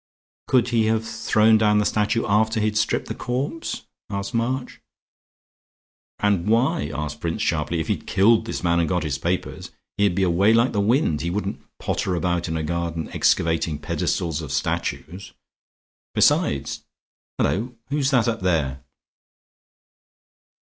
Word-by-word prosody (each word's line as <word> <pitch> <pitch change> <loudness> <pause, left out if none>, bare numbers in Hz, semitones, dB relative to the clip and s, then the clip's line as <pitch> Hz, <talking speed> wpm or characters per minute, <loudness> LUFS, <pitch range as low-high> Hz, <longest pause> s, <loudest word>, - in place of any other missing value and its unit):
"Could 125 -2 +3
he 115 -3 +2
have 110 0 0
thrown 110 0 +3
down 105 -1 +3
the 105 - +2
statue 110 +2 +1
after 110 +2 +2
he'd 105 0 0
stripped 110 +2 +1
the - - -3
corpse?" 135 +6 -3 0.3
asked 100 +2 -4
March. 125 +3 -2 1.4
"And 100 -3 +1
why?" 115 - +2
asked 75 0 -4
Prince, 85 -1 -2
sharply. 80 +1 0
"If 80 - -3
he'd - - -2
killed 110 +3 +3
his - - -4
man 85 0 +2
and 85 -2 +1
got 90 -1 0
his 70 -3 -2
papers, 90 +2 -3 0.3
he'd 100 -3 +2
be 95 - +1
away 95 +5 +3
like 120 +2 +3
the 100 - 0
wind. 110 - +2
He 85 - -2
wouldn't 100 +2 -3 0.2
potter 90 - -1
about 85 0 -1
in 80 -1 -2
a 80 - -2
garden 85 0 -3
excavating 80 -1 +1
the - - -18
pedestals 80 +1 -1
of 75 -4 -7
statues. 95 +9 -3 0.8
Besides - - +2 0.5
Hullo, 120 +5 -1
who's 140 -1 +1
that 125 -4 +3
up 115 -1 0
there?" 75 -7 0
100 Hz, 150 wpm, -23 LUFS, 85-115 Hz, 1.4 s, Could